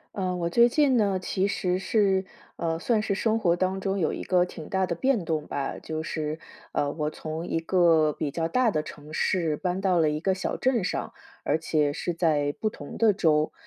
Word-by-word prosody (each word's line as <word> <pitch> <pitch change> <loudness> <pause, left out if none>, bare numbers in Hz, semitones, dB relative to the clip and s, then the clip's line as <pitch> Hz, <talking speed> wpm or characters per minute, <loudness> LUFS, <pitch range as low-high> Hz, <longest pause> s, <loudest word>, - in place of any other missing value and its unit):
呃， 185 -2 -1
我 170 -1 -1
最 235 +6 +6
近 265 0 +3
呢， 200 -3 +2
其 190 +1 0
实 180 -2 -1
是 195 -1 +2 0.3
呃， 165 -1 -1
算 220 +4 +1
是 200 -2 -1
生 225 +2 +1
活 170 -5 +2
当 185 +2 -1
中 195 0 -1
有 170 -5 +1
一 - - -5
个 180 -1 +3
挺 165 -3 -7
大 190 -1 +1
的 170 - -2
变 235 +2 +1
动 155 -2 -2
吧。 140 -1 -3
就 155 0 -4
是， 155 -1 -3 0.4
呃， 145 0 0
我 150 0 -2
从 160 +2 -6
一 165 - 0
个 165 -3 +4
比 150 0 -3
较 165 +3 -2
大 250 +6 +3
的 155 -5 -1
城 150 0 -11
市 165 -2 +1
搬 180 +3 -2
到 190 -3 +2
了 155 -2 +3
一 150 0 -2
个 190 +3 +1
小 185 - -3
镇 250 -5 +1
上， - - -3 0.3
而 150 - +2
且 155 -2 0
是 175 +3 -3
在 150 -4 +1
不 215 - 0
同 145 -8 -9
的 225 -2 +4
州。 155 -5 +2
175 Hz, 235 characters per minute, -26 LUFS, 155-195 Hz, 0.4 s, 最